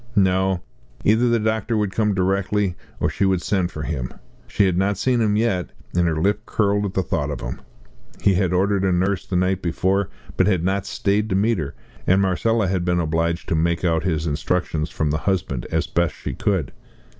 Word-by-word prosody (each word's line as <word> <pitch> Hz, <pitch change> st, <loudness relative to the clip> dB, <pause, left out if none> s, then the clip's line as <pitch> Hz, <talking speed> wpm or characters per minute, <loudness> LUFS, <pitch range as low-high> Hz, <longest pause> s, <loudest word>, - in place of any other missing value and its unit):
No 95 Hz, -2 st, +2 dB, 0.4 s
either 115 Hz, +3 st, +4 dB
the 120 Hz, -, +3 dB
doctor 110 Hz, +1 st, 0 dB
would 105 Hz, -2 st, 0 dB
come 105 Hz, +1 st, +1 dB
directly, 95 Hz, 0 st, +1 dB, 0.2 s
or -, -, +2 dB
she -, -, -1 dB
would 95 Hz, -2 st, +2 dB
send 95 Hz, -4 st, +1 dB
for 75 Hz, -4 st, -6 dB
him. 65 Hz, -6 st, -3 dB, 0.4 s
She 100 Hz, -, +2 dB
had 95 Hz, -2 st, +2 dB
not 95 Hz, +2 st, +1 dB
seen 125 Hz, +2 st, +1 dB
him 105 Hz, -2 st, +2 dB
yet, 105 Hz, -5 st, 0 dB, 0.3 s
and 90 Hz, -1 st, +3 dB
her 80 Hz, -2 st, 0 dB
lip 105 Hz, +5 st, 0 dB
curled 105 Hz, -1 st, +1 dB
at 95 Hz, -, -8 dB
the 95 Hz, -, +2 dB
thought -, -, -1 dB
of -, -, -4 dB
him. -, -, -5 dB, 0.6 s
He 100 Hz, -, +3 dB
had 90 Hz, -1 st, +1 dB
ordered 95 Hz, +2 st, +2 dB
a 95 Hz, -, +2 dB
nurse 95 Hz, +2 st, 0 dB
the 95 Hz, -, -3 dB
night 90 Hz, +1 st, +1 dB
before, 95 Hz, +3 st, 0 dB, 0.3 s
but -, -, +4 dB
had 95 Hz, -5 st, +2 dB
not 95 Hz, +1 st, 0 dB
stayed 105 Hz, +2 st, 0 dB
to 95 Hz, -, +1 dB
meet 105 Hz, +1 st, +2 dB
her, 70 Hz, -3 st, -4 dB, 0.3 s
and 95 Hz, +1 st, +5 dB
Marcella 100 Hz, +3 st, +1 dB
had 95 Hz, -1 st, 0 dB
been 90 Hz, 0 st, +1 dB
obliged 85 Hz, +1 st, -1 dB
to -, -, +1 dB
make 85 Hz, +2 st, +1 dB
out 80 Hz, -2 st, +2 dB
his 80 Hz, -4 st, -1 dB
instructions 80 Hz, +1 st, -1 dB
from 75 Hz, -2 st, -1 dB
the 75 Hz, -, 0 dB
husband 80 Hz, -10 st, -1 dB
as -, -, +1 dB
best 85 Hz, -2 st, 0 dB
she -, -, -5 dB
could. 95 Hz, -8 st, -1 dB
95 Hz, 210 wpm, -22 LUFS, 85-100 Hz, 0.6 s, and